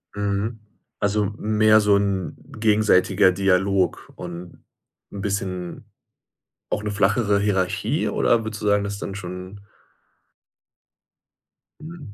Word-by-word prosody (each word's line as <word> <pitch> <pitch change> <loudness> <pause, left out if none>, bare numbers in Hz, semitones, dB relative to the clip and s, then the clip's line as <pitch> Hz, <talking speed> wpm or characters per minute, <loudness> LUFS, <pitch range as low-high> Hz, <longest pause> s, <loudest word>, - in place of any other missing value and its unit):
Mhm, 105 +2 -2 0.4
also 105 0 +1
mehr 110 0 +4
so 105 -1 +4
'n 100 -3 -1 0.2
gegenseitiger 105 -4 +4
Dialog 95 0 +1
und 90 0 -9 0.5
'n 100 - -6
bisschen 95 -3 -4 0.8
auch 105 - -2
'ne 105 - -2
flachere 100 +1 +2
Hierarchie 95 -3 0
oder 115 -1 +2
würdest 110 -1 -6
du 105 - -2
sagen, 100 0 +3
dass 100 0 -4
dann 95 - -5
schon 90 +1 -8 2.2
Mhm. 155 -8 -10
100 Hz, 110 wpm, -23 LUFS, 95-105 Hz, 2.2 s, mehr